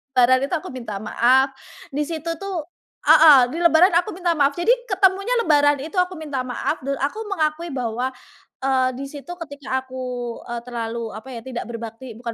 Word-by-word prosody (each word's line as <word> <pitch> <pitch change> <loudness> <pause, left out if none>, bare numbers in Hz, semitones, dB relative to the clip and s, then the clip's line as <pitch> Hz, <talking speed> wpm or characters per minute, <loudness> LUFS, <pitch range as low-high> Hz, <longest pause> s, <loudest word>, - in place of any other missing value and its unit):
Lebaran 255 +1 +5
itu 355 - -7
aku - - -8
minta 235 -5 -5
maaf, 260 +5 +3 0.4
di 290 - -1
situ 330 0 -4
tuh 385 -5 -3 0.4
heeh, 300 -3 +8
di - - -4
lebaran 340 +2 +5
aku 350 - 0
minta 355 -2 0
maaf 280 0 +3
jadi 345 +7 +3 0.2
ketemunya 390 +4 +2
lebaran 290 -4 +4
itu 320 +6 -8
aku 360 0 0
minta 295 -4 -4
maaf 255 +5 -2
dan 275 0 -1
aku 290 +10 -1
mengakui 330 -2 -1
bahwa, 245 0 -2 0.5
eee, 260 -1 +2
di 275 - -5
situ 290 +4 -9
ketika 285 -2 -4
aku, 260 0 -7 0.5
eee, 240 0 -4
terlalu, 230 -1 -4
apa 220 +5 -9
ya, 230 - -6
tidak 250 -2 -5
berbakti, 230 +1 -7
bukan 235 -1 -5
275 Hz, 180 wpm, -22 LUFS, 250-330 Hz, 0.5 s, heeh